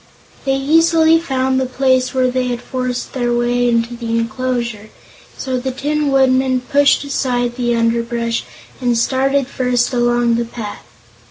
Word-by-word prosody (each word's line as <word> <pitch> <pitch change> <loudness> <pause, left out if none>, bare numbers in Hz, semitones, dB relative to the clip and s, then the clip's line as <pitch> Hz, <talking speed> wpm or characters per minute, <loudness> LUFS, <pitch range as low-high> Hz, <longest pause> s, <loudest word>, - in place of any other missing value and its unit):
They 270 0 +1
easily 325 +3 +4
found 265 -4 0
the 260 - -1
place 255 0 +1
where 255 -1 +1
they 255 0 -1
had 245 -1 -2
forced 255 0 -4
their 245 -2 -1
way 240 0 +1
into 235 0 0
the 230 -1 -2
enclosure, 235 -2 -3 0.5
so 260 -1 -2
the 260 +2 -3
Tin 290 +3 -1
Woodman 260 -1 +2
pushed 285 +3 +3
aside 245 -4 -1
the 240 -1 0
underbrush 230 0 -1 0.4
and 245 -2 +1
started 270 +3 +1
first 250 -1 0
along 240 -1 +2
the 235 - -1
path. 220 - -8
250 Hz, 150 wpm, -17 LUFS, 240-265 Hz, 0.5 s, easily